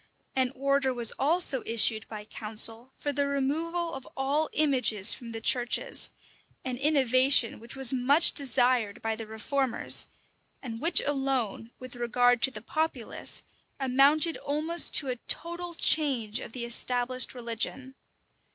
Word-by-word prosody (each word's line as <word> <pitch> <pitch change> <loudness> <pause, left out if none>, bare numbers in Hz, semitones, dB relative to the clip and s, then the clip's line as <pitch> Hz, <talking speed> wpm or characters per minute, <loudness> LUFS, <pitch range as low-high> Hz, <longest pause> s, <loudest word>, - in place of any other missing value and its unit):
[*] - - -42
An 260 -1 0
order 275 0 0
was 235 -2 +5
also 295 -3 +2
issued 225 -1 +2
by 210 -1 -9
council 225 +3 -2
for 290 - -3
the 280 +1 -1
removal 325 +5 -3
of 270 - -9
all 285 +3 -1
images 250 -9 +3
from 235 -2 -10
the 225 - -6
churches; 240 +1 0 0.6
an 255 -1 -4
innovation 260 -4 +3
which 235 +3 -8
was 270 -1 +1
much 275 +6 +4
desired 250 -6 +1
by 225 0 -2
the 220 0 -9
reformers, 245 +4 -1 0.5
and 230 -3 -8
which 335 +2 +5
alone, 265 -6 -2
with 255 -1 -11
regard 245 0 +1
to - - +4
the 260 - -10
populace, 310 -7 -3 0.4
amounted 280 +5 +2
almost 310 +4 0
to 280 - +3
a 250 -1 -3
total 345 +1 -3
change 255 -10 +3
of - - -9
the 245 -2 -5
established 245 +2 0
religion. 245 +2 -4
260 Hz, 140 wpm, -27 LUFS, 235-285 Hz, 0.6 s, was